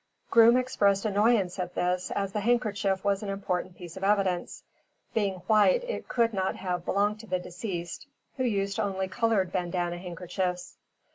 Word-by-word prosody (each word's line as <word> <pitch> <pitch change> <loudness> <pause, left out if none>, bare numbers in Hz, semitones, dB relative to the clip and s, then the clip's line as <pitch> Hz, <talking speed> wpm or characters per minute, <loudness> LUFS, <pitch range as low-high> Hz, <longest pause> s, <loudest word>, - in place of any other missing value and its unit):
Groom 230 +1 +7
expressed 205 -6 +2
annoyance 205 -3 +2
at 180 -1 -4
this, 180 0 0
as 195 -1 -2
the 210 - 0
handkerchief 210 -4 +1
was 200 -1 +1
an 205 - -4
important 185 -2 -3
piece 175 -2 -9
of 190 - -7
evidence. 195 -3 0 0.5
Being 200 -4 +1
white 220 - +4
it - - -5
could 230 -2 +1
not 190 -1 -1
have 180 -2 -3
belonged 205 +2 +1
to 225 - -11
the 185 - 0
deceased, 180 +3 -6 0.3
who 260 - 0
used 200 -4 0
only 190 -1 -1
colored 195 -2 +1
bandana 175 -1 -2
handkerchiefs. 180 0 -4
195 Hz, 160 wpm, -28 LUFS, 180-215 Hz, 0.5 s, Groom